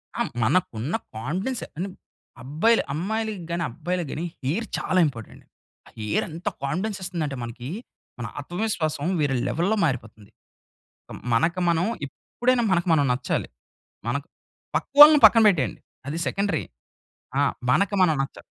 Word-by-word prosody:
ఆ! -, -, -1 dB, 0.2 s
మనకున్న 130 Hz, -, 0 dB, 0.2 s
కాన్ఫిడెన్స్ 185 Hz, -, -3 dB, 0.2 s
అంటే 185 Hz, +4 st, -3 dB, 0.5 s
అబ్బాయిలు 160 Hz, -, +2 dB
అమ్మాయిలకి 215 Hz, +5 st, -2 dB
గాని, 170 Hz, 0 st, -1 dB
అబ్బాయిలకి 175 Hz, +5 st, -3 dB
గాని 165 Hz, -, -3 dB, 0.2 s
హెయిర్ 170 Hz, -, -1 dB
చాలా 185 Hz, -, +1 dB
ఇంపార్టెంట్. 115 Hz, -6 st, -9 dB, 0.4 s
ఆ -, -, -15 dB
హెయిర్ 105 Hz, -1 st, 0 dB
ఎంత 165 Hz, +3 st, -8 dB, 0.2 s
కాన్ఫిడెన్స్ 190 Hz, +9 st, -2 dB
ఇస్తుందంటే 165 Hz, -6 st, -3 dB
మనకి 120 Hz, +2 st, -7 dB, 0.5 s
మన 115 Hz, -, -4 dB
ఆత్మవిశ్వాసం 175 Hz, -4 st, -2 dB, 0.2 s
వేరే 140 Hz, -2 st, +1 dB
లెవెల్లో 180 Hz, +7 st, +1 dB
మారిపోతుంది. 115 Hz, -7 st, -4 dB, 0.8 s
కు -, -, -10 dB, 0.2 s
మనకు 170 Hz, +10 st, +2 dB
మనం 170 Hz, +1 st, +2 dB, 0.2 s
ఎప్పుడైనా 245 Hz, -, -1 dB
మనకు 175 Hz, -1 st, +1 dB
మనం 145 Hz, -3 st, +3 dB
నచ్చాలి. 125 Hz, 0 st, -2 dB, 0.6 s
మన‌కు -, -, -2 dB, 0.5 s
పక్కవాళ్ళని 295 Hz, +1 st, +8 dB
పక్కన 230 Hz, -, +7 dB
పెట్టేయండి. 165 Hz, -11 st, +1 dB, 0.3 s
అది 150 Hz, +3 st, -3 dB
సెకండరీ. 200 Hz, -6 st, 0 dB, 0.8 s
ఆ! -, -, +4 dB, 0.3 s
మనకు 200 Hz, +8 st, +2 dB
మనం 175 Hz, -4 st, +5 dB
నచ్చాలి. 135 Hz, -, -6 dB
170 Hz, 130 wpm, -24 LUFS, 140-200 Hz, 0.8 s, పక్కవాళ్ళని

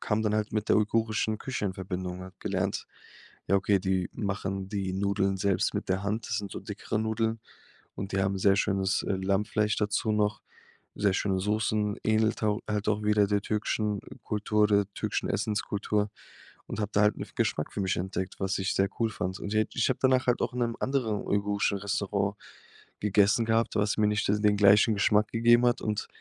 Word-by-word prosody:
kam 105 Hz, 0 st, 0 dB
dann 105 Hz, -1 st, +1 dB
halt 110 Hz, 0 st, -1 dB
mit 105 Hz, -1 st, -2 dB
der -, -, +5 dB
uigurischen 110 Hz, 0 st, +1 dB
Küche 130 Hz, -3 st, -4 dB
in 95 Hz, -, -2 dB
Verbindung 90 Hz, -1 st, -4 dB
und -, -, -7 dB
habe 95 Hz, 0 st, -14 dB
gelernt, 95 Hz, -1 st, -2 dB, 0.6 s
ja, 100 Hz, -, +3 dB
okay, 100 Hz, 0 st, +2 dB
die 95 Hz, -1 st, 0 dB
machen 95 Hz, -1 st, -3 dB
die 95 Hz, -2 st, -2 dB
Nudeln 100 Hz, 0 st, 0 dB
selbst 100 Hz, -1 st, +1 dB
mit -, -, -3 dB
der 95 Hz, +1 st, 0 dB
Hand. 110 Hz, +3 st, -2 dB
Das 115 Hz, -, -1 dB
sind 100 Hz, -2 st, -5 dB
so -, -, -5 dB
dickere 105 Hz, +1 st, -4 dB
Nudeln, 110 Hz, 0 st, -1 dB, 0.6 s
und 95 Hz, 0 st, -5 dB
die 95 Hz, -, +1 dB
haben 95 Hz, 0 st, 0 dB
sehr 95 Hz, +1 st, +4 dB
schönes, 95 Hz, -2 st, +1 dB
äh, -, -, -1 dB
Lammfleisch 105 Hz, +3 st, 0 dB
dazu 105 Hz, +2 st, 0 dB
noch, 105 Hz, 0 st, 0 dB, 0.5 s
sehr 100 Hz, -2 st, +2 dB
schöne 95 Hz, -1 st, 0 dB
Soßen, 105 Hz, 0 st, 0 dB
ähnelt 110 Hz, 0 st, +1 dB
hau 105 Hz, +1 st, +1 dB
halt 105 Hz, -1 st, -1 dB
auch 105 Hz, 0 st, +1 dB
wieder 105 Hz, -1 st, +4 dB
der 100 Hz, -1 st, +2 dB
türkischen 105 Hz, -1 st, -1 dB, 0.2 s
Kultur 105 Hz, 0 st, 0 dB
oder 100 Hz, -1 st, +3 dB
türkischen -, -, -2 dB
Essenskultur 105 Hz, 0 st, -1 dB, 0.6 s
und -, -, -6 dB
habe 105 Hz, 0 st, -2 dB
da 100 Hz, -, +4 dB
halt 105 Hz, 0 st, +3 dB
'ne -, -, -4 dB
F -, -, -20 dB
Geschmack 75 Hz, -, -1 dB
für 100 Hz, -, -3 dB
mich 95 Hz, -, 0 dB
entdeckt, 95 Hz, +1 st, -3 dB
was 95 Hz, 0 st, 0 dB
ich 95 Hz, 0 st, -1 dB
sehr 95 Hz, 0 st, +2 dB
cool 115 Hz, -1 st, +2 dB
fand. 95 Hz, -2 st, -4 dB
Und 100 Hz, -, -4 dB
je 110 Hz, 0 st, +3 dB
ich 120 Hz, -, +2 dB
habe 125 Hz, -, -1 dB
danach 130 Hz, -1 st, +3 dB
halt 125 Hz, -, +3 dB
auch -, -, -1 dB
in 125 Hz, -, -2 dB
'nem 115 Hz, -1 st, 0 dB
anderen 120 Hz, -6 st, 0 dB
uigurischen 100 Hz, 0 st, 0 dB
Restaurant 100 Hz, -1 st, -1 dB, 0.6 s
gegessen 105 Hz, +2 st, +3 dB
gehabt, 115 Hz, +1 st, +1 dB
was 105 Hz, 0 st, +1 dB
mir 105 Hz, -, +4 dB
nicht 105 Hz, 0 st, 0 dB
das 105 Hz, +1 st, +2 dB
den 105 Hz, -1 st, +3 dB
gleichen 105 Hz, +2 st, +5 dB
Geschmack 105 Hz, +1 st, +3 dB
gegeben 120 Hz, +1 st, +4 dB
hat. 120 Hz, +1 st, +2 dB
Und 105 Hz, -1 st, -2 dB
105 Hz, 205 wpm, -28 LUFS, 100-110 Hz, 0.6 s, der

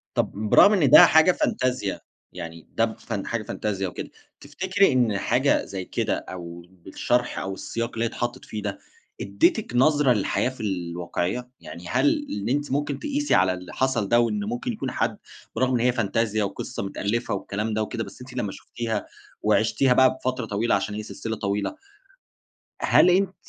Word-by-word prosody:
طب -, -, +1 dB, 0.2 s
برغم 205 Hz, -, +7 dB
إن 155 Hz, -10 st, +3 dB
ده 150 Hz, -, +10 dB
حاجة 160 Hz, +3 st, +6 dB
فانتازيا، 130 Hz, -, -1 dB, 0.3 s
يعني 80 Hz, 0 st, -8 dB
ده 115 Hz, -1 st, +1 dB
ف 115 Hz, -, -7 dB
حاجة 105 Hz, +2 st, -3 dB
فانتازيا 100 Hz, -3 st, -3 dB
وكده، 90 Hz, -, -7 dB, 0.3 s
تفتكري 190 Hz, +6 st, +1 dB
إن 115 Hz, -6 st, +2 dB
حاجة -, -, +2 dB
زي 95 Hz, -1 st, -6 dB
كده، -, -, -1 dB
أو 85 Hz, -1 st, -8 dB
بالشرح 95 Hz, +6 st, -2 dB
أو 95 Hz, 0 st, -4 dB
السياق 115 Hz, +4 st, -4 dB
اللي 115 Hz, 0 st, -1 dB
هي -, -, 0 dB
اتحطِّت 120 Hz, +2 st, -4 dB
فيه 105 Hz, -, -6 dB
ده، 100 Hz, -1 st, -4 dB, 0.4 s
أدِّتك 315 Hz, -, +1 dB
نظرة 145 Hz, 0 st, +4 dB
للحياة 105 Hz, +4 st, 0 dB
في 130 Hz, -4 st, -9 dB
الواقعية؟ 90 Hz, +5 st, -3 dB
يعني 85 Hz, +1 st, -10 dB
هل -, -, +2 dB, 0.2 s
اللي 105 Hz, +4 st, -3 dB
أنتِ 145 Hz, -1 st, -1 dB
ممكن 145 Hz, 0 st, -1 dB
تقِيسي 290 Hz, 0 st, 0 dB
على 95 Hz, 0 st, +3 dB
اللي 90 Hz, -1 st, -9 dB
حصَل 125 Hz, -6 st, 0 dB
ده، 120 Hz, -, +5 dB
وإن 105 Hz, -3 st, 0 dB
ممكن 120 Hz, +4 st, -3 dB
يكون -, -, -4 dB
حد، -, -, -1 dB, 0.4 s
برغم 130 Hz, 0 st, +1 dB
إن 120 Hz, -, +2 dB
هي 125 Hz, +2 st, +3 dB
فانتازيا، 110 Hz, -2 st, 0 dB
وقصة 100 Hz, 0 st, -4 dB
متألَّفة 105 Hz, +3 st, -2 dB
والكلام 105 Hz, +2 st, -3 dB
ده 110 Hz, -, 0 dB
وكده، 115 Hz, +1 st, -3 dB
بس 100 Hz, +4 st, -12 dB
أنتِ 125 Hz, 0 st, -10 dB
لمّا 105 Hz, -6 st, -2 dB
شُفتِيها 115 Hz, -3 st, -4 dB, 0.4 s
وعِشتِيها 130 Hz, -2 st, +3 dB
بقى 130 Hz, 0 st, +5 dB
بفترة 130 Hz, -2 st, -3 dB
طويلة 110 Hz, +3 st, 0 dB
عشان 105 Hz, -, -2 dB
هي 110 Hz, -, -4 dB
سلسلة 110 Hz, +1 st, -5 dB
طويلة، 100 Hz, -, -2 dB, 1.1 s
هل 180 Hz, -, +5 dB
أنتِ 190 Hz, +1 st, +2 dB
115 Hz, 175 wpm, -24 LUFS, 100-130 Hz, 1.1 s, ده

